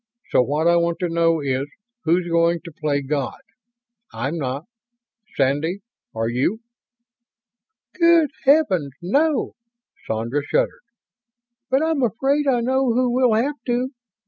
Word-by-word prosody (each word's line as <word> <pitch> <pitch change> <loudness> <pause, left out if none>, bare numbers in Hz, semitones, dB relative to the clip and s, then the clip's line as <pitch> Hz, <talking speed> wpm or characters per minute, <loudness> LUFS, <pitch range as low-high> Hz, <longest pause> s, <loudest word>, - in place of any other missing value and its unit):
So - - +5
what 145 +5 0
I 170 0 +5
want 170 0 0
to 175 - 0
know 165 -1 +2
is, 135 0 -1 0.4
who's 175 +2 +2
going 170 0 +2
to 170 - -8
play 150 -2 -2
God. 140 0 -2 0.7
I'm 135 +9 -3
not. 135 +2 -3 0.7
Sandy, 145 +8 0 0.3
are 115 0 -1
you?" 130 - 0 1.4
"Good 335 -3 +5
Heavens, 195 - +3
no!" 285 - +1 0.6
Sandra 115 +6 -1
shuddered. - - 0 0.9
"But 265 +3 +2
I'm 320 -3 0
afraid 270 +5 +1
I 250 -3 +2
know 260 +1 +1
who 250 +1 +1
will 250 -3 +3
have 280 +6 -1
to. 245 +1 0
170 Hz, 130 wpm, -22 LUFS, -, 1.4 s, So